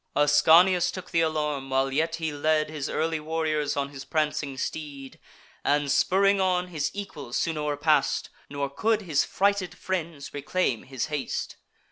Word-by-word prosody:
Ascanius 165 +5 +5
took 185 -1 -7
th' 165 - +3
alarm, 150 -4 -1
while 135 0 +1
yet 165 +3 +1
he 160 -1 -3
led 155 +1 +1
His 150 -2 -4
early 160 0 -1
warriors 155 -2 -1
on 140 0 -1
his 140 -1 -9
prancing 150 -3 -1
steed, 140 -2 -6 0.4
And, 145 -1 +1
spurring 195 +7 +3
on, 180 -1 +1
his 155 -4 -1
equals 160 -11 -5
soon 165 - 0
o'erpass'd; 150 -1 +1 0.2
Nor 140 0 -2
could 215 +7 +1
his 155 -6 +2
frighted 200 -2 0
friends 170 -6 -4
reclaim 145 -3 -1
his 130 -2 -3
haste. 145 -3 -3
155 Hz, 150 wpm, -26 LUFS, 145-170 Hz, 0.4 s, Ascanius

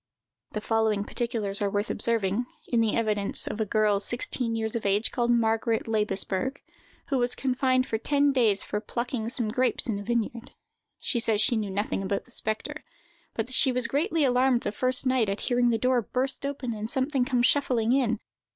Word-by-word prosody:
The 215 - -3
following 220 -2 +1
particulars 215 -4 -2
are 200 - +1
worth 205 +2 -1
observing, 230 0 0 0.2
in 235 -2 +2
the 225 -2 +1
evidence 210 -3 +1
of 220 - -3
a 215 - -1
girl 210 -1 +2
sixteen 240 +2 -2
years 220 0 -2
of 230 - -2
age, 200 +2 +1
called 240 -1 -1
Margaret 225 -1 +1
Laibesberg, 210 +3 -1 0.5
who 270 -3 +1
was 245 0 0
confined 255 -1 +1
for 220 - -2
ten 285 +3 +2
days 225 -7 +3
for 210 - -3
plucking 235 -1 -3
some 235 -3 0
grapes 250 +1 +1
in 210 -4 -1
a - - -6
vineyard. 235 +1 -3 0.4
She 240 - -1
says 225 -2 +3
she 225 +3 +3
knew 215 -2 -2
nothing 200 +1 -2
about 195 +1 -2
the 250 - -11
spectre, 220 -2 -4 0.5
but 225 - -1
that 255 - -6
she 265 0 +4
was 250 -1 -1
greatly 320 +2 0
alarmed 250 -1 +3
the 205 - -2
first 255 +5 +1
night 255 -5 +2
at 195 - -3
hearing 245 -1 +2
the 230 - +2
door 250 +1 +2
burst 260 +5 -1
open 265 -4 -4
and 215 0 -5
something 265 0 +1
come 250 -1 0
shuffling 245 -4 +2
in. 235 -5 +1
235 Hz, 195 wpm, -27 LUFS, 215-255 Hz, 0.5 s, she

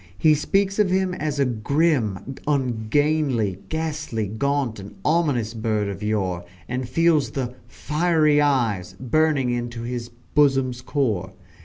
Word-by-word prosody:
He 155 -1 +5
speaks 195 +7 +1
of 205 -3 +4
him 185 0 +1
as 150 -4 -3
a 140 - +4
"grim, 130 - 0
ungainly, 130 - +1
ghastly, 155 -8 -2
gaunt, 120 +2 -1
and 100 +1 -10
ominous 145 -9 +1
bird 110 -2 -1
of 100 0 -6
yore," 95 -5 -1 0.2
and 125 0 -3
feels 165 0 +3
the 125 -3 -3
"fiery 155 -1 +2
eyes" 115 -11 +1
burning 135 0 +2
into 120 -1 -3
his 120 0 -4 0.2
"bosom's 135 -4 +3
core." 125 -8 -1
130 Hz, 130 wpm, -23 LUFS, 110-155 Hz, 0.2 s, He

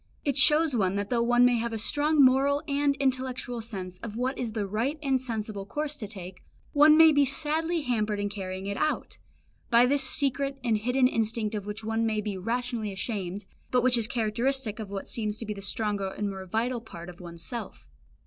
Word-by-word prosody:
It 280 - 0
shows 300 +1 +6
one 195 -4 +1
that 200 +2 -3
though 240 -1 +2
one 240 +1 +4
may 245 -1 +3
have 235 0 -3
a - - -2
strong 290 +5 +3
moral 275 +3 +3
and 285 0 +1
intellectual 255 -3 -2
sense 190 -5 -7
of 220 -2 -7
what 255 +3 -1
is 230 -3 -4
the 215 -2 -2
right 230 +10 -2
and 265 -2 +1
sensible 215 -5 -4
course 300 +4 -3
to 220 -7 -5
take, 190 -3 -8 0.3
one 300 +1 +6
may 320 -1 +8
be 285 -1 +4
sadly 315 +4 -1
hampered 215 -6 -1
in 205 - -1
carrying 190 -2 -6
it 200 0 -3
out, 310 - -2 0.5
by 235 0 +6
this 280 +2 +2
secret 275 0 +2
and 225 -3 +1
hidden 250 +3 +2
instinct 225 -2 0
of 205 -1 -4
which 210 +1 -6
one 225 +1 -1
may 220 -1 0
be 210 -1 -3
rationally 230 +2 -3
ashamed, 195 -1 -4 0.2
but 250 -1 +2
which 255 -1 +5
is 230 -2 +2
characteristic 235 +1 -1
of 215 -3 -6
what 195 -1 -6
seems 215 -2 -3
to 230 - -6
be 210 - -4
the 200 - -9
stronger 200 0 0
and 200 +1 -3
more 190 -1 -8
vital 230 +5 -1
part 170 -6 -10
of 180 0 -11
one's 170 -1 -9
self. 235 - -6
230 Hz, 210 wpm, -27 LUFS, 210-265 Hz, 0.5 s, may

